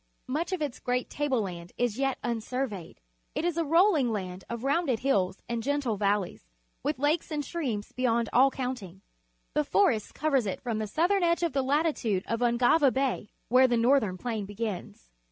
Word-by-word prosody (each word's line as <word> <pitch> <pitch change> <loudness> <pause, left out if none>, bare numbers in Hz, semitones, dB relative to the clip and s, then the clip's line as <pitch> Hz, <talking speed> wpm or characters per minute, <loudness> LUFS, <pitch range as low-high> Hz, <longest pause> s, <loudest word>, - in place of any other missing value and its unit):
IMuch 310 +8 -2
of 370 - 0
this 290 -5 -3
great 250 0 -2
table 275 -6 0
land 175 -2 -7
is 245 -1 0
yet 270 -1 +1
un 235 -1 -1
survej'ed. 220 -6 -4 0.4
It 325 - -1
is 350 -2 0
a 335 - +1
rolling 325 - +4
land 185 -3 -4
of 235 0 -5
rounded 275 -4 +1
hills 200 -8 0
and 235 -1 -2
gentle 275 -3 0
valleys, 200 - -1 0.3
with - - -1
lakes 295 +5 +1
and 300 -2 -2
streams 245 -12 -3
bej'ond 235 -2 +1
all 265 +3 +6
counting. 245 -9 -5 0.5
The 300 - +2
forest 275 - +1
covers 275 -7 +1
it 190 - -3
from 230 -3 -3
the 215 - -2
southern 355 - +2
edge 340 0 +2
to 340 - +2
the 270 -1 0
lati 295 +4 +2
tude 200 -5 -1
of 230 - -2
Ungava 245 +4 +4
Bay, 260 -5 -1 0.2
where 255 +2 +5
the 240 -1 +1
Northern 230 -5 +3
Plain 220 -2 -3
begins. 205 - -6
250 Hz, 190 wpm, -28 LUFS, 215-290 Hz, 0.5 s, all